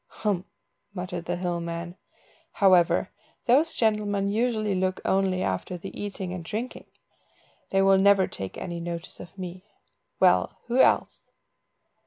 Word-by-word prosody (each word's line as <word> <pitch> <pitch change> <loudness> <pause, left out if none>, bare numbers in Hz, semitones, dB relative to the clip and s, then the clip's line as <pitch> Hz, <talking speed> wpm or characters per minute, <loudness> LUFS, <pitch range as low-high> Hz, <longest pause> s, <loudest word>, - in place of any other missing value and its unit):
"Hem!" 200 -4 0 0.5
muttered 180 -2 -5
the - - -1
hill 175 -1 -2
man; 170 +1 -5 0.6
"however, 185 -4 +4 0.3
those 290 +7 +3
gentlemen 210 -3 +1
usually 215 -1 0
look 185 0 0
only 190 -1 +1
after 95 - -2
the 190 +3 -8
eating 195 -3 -5
and 180 -2 -5
drinking; 220 +8 -5 0.8
they 195 0 +3
will 195 0 +5
never 195 -1 +5
take 95 -1 -7
any 170 -2 -5
notice 170 0 -6
of 175 +3 -11
me. 180 0 -7 0.6
Well, - - +3
who 245 +2 0
else?" - - +2
190 Hz, 135 wpm, -26 LUFS, 175-205 Hz, 0.8 s, will